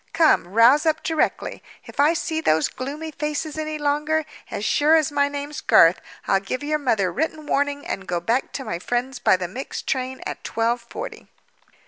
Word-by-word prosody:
Come, 320 - +4
rouse 235 - +5
up 310 -1 +1
directly. 320 -2 -1 0.2
If - - -13
I 295 +3 +5
see 320 0 -2
those 160 - +2
gloomy 295 +5 -6
faces 300 +1 -3
any 310 0 -3
longer, 300 +2 0 0.2
as 205 - -4
sure 300 +6 +4
as 310 -2 +2
my 285 0 +2
name's 285 +1 -5
Garth, 165 +2 +5 0.3
I'll 195 - +3
give 225 +8 -4
your 305 +1 0
mother 220 -9 +1
written 310 +2 -2
warning 285 0 0
and 195 - -5
go 175 -1 -1
back 230 +9 0
to 270 - -5
my 170 - -3
friends 245 +5 -2
by 185 - +4
the 180 -1 -3
mixed 250 +10 -6
train 260 0 -2
at - - -6
twelve 230 +2 0
forty." 440 - -8
285 Hz, 185 wpm, -23 LUFS, 235-305 Hz, 0.3 s, rouse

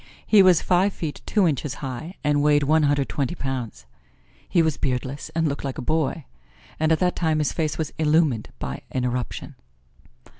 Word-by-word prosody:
He 210 -2 +6
was 185 -3 +5
five 185 +2 +2
feet 155 -3 -5
two 205 -4 +3
inches 145 -2 -2
high 145 +7 -6
and 145 -1 +2
weighed 145 0 +4
one 155 +3 +3
hundred 145 -2 +2
twenty 140 +4 -2
pounds. 125 - -5 0.6
He 170 - +3
was 160 -3 +1
beardless 130 +2 -3
and 165 -1 +2
looked 140 -1 -3
like 135 -2 -4
a - - -3
boy, 155 0 -1 0.5
and 155 +1 +2
at 160 - +4
that 180 +1 +1
time 160 -3 +1
his 150 -1 0
face 155 -2 -1
was 160 -2 -3
illumined 150 -7 +2
by 65 - -5
an 130 -1 -2
eruption. 125 -1 -3
150 Hz, 185 wpm, -24 LUFS, 135-160 Hz, 0.6 s, He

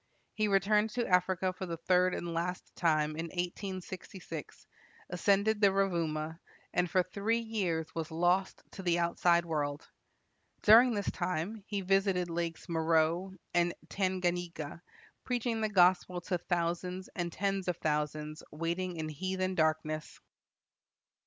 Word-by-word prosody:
He 215 0 +1
returned 210 +2 +3
to 240 -1 +1
Africa 185 0 +2
for 185 0 -6
the 165 -1 -4
third 180 +2 +3
and 170 -1 -4
last 175 +2 -3
time 155 -3 +2
in 165 +2 -4
1866, 180 -2 -6 0.5
ascended 200 +4 +2
the 200 - +7
Rovuma, 165 -5 -1 0.3
and 180 0 +1
for 185 +2 +3
three 200 +5 0
years 185 -8 -2
was 165 -2 -3
lost 175 +4 +1
to - - -8
the 175 -2 +2
outside 170 0 +3
world. 145 -2 -2 0.8
During 230 +3 +7
this 205 - -1
time 185 +4 -3
he 205 -2 -2
visited 190 -2 +1
lakes 165 0 -3
Meroe 165 +2 +1 0.2
and 175 0 +2
Tanganyika, 175 -4 -2 0.4
preaching 240 -2 -1
the 215 - +1
gospel 180 -2 +4
to 180 0 -2
thousands 175 +2 -2
and 175 -2 -2
tens 195 +1 -1
of 180 -2 0
thousands 150 0 -2
waiting 170 +3 -2
in 160 -1 -3
heathen 185 +4 -2
darkness. 155 -2 -1
180 Hz, 135 wpm, -32 LUFS, 165-190 Hz, 0.8 s, the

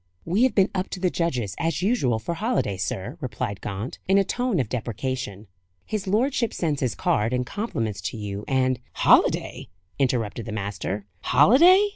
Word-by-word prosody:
"We 185 +7 +1
have 260 - 0
been 195 -1 +4
up 185 0 -2
to 185 - -5
the 180 -1 +1
judges, 125 - -1
as 165 0 -1
usual, 190 - +2
for 110 +10 -3
holiday, 205 - 0
sir," 95 - -4
replied 105 -6 -4
Gaunt, 100 +5 -5
in 195 +1 +4
a 200 - +5
tone 245 -2 -1
of 125 - 0
deprecation. 115 -2 -4 0.4
"His 210 -2 -3
lordship 235 +3 +1
sends 155 -5 -1
his 125 -4 0
card 110 +4 +1
and 125 0 0
compliments 115 - -3
to - - -8
you, 100 -1 -5
and 130 -1 +1
" - - -42
"Holiday!" - - +3 0.3
interrupted 120 -4 0
the - - -4
master. 100 -1 -4
"Holiday!" 335 - +6
130 Hz, 175 wpm, -25 LUFS, -, 0.4 s, Holiday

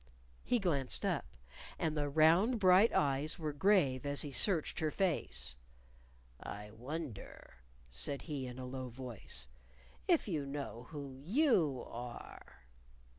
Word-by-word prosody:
He 245 - +2
glanced 150 - +1
up. - - 0 0.5
And 160 -2 0
the 145 -1 0
round, 165 - +5
bright 190 +3 +6
eyes 145 +2 +1
were 155 -3 -3
grave 145 -6 +3
as 145 0 +1
he 145 - -5
searched 170 +2 +1
her 155 - +1
face. 65 - 0 0.9
"I 105 +1 -7
wonder," 125 - -7 0.3
he - - -19
said 140 - -1
in 130 -5 -5
a 130 - -5
low 130 0 -5
voice, 115 - -7 0.6
"if 340 -9 +3
you 160 -7 -1
know 140 -4 -6
who 145 -3 -6
you 180 - +2
are." 120 - -9
145 Hz, 130 wpm, -35 LUFS, 125-170 Hz, 0.9 s, bright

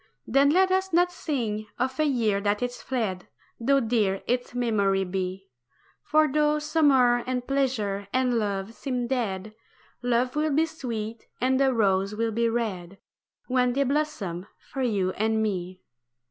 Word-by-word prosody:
Then 275 +1 +4
let 375 +4 +4
us 380 0 +1
not 355 +1 +3
sing 225 -11 -3
of 260 +2 -2
a 310 - +3
year 225 -8 +1
that 205 +3 0
is 245 0 -4
fled 215 -8 -3 0.3
Though 275 +4 +3
dear 220 -5 0
its 245 0 -2
memory 200 -5 +1
be: 185 0 -4 0.5
For 310 0 +3
though 300 +1 +2
summer 290 -5 +4
and 250 -1 -2
pleasure 225 -8 -1
and 250 -2 +2
love 200 0 -2
seem 250 -1 -3
dead, 215 -5 -2 0.5
Love 245 +1 +1
will 305 +1 +1
be 320 +2 +4
sweet, 230 -8 -6
and 260 +1 +2
the 270 -1 +4
rose 200 -3 +1
will 225 +1 0
be 230 +1 +1
red 200 -6 -3 0.5
When 250 -1 +1
they 280 +2 +2
blossom 250 - -2
for 270 - -7
you 200 -7 +1
and 220 +3 0
me. 185 -3 -3
240 Hz, 155 wpm, -26 LUFS, 205-270 Hz, 0.5 s, Then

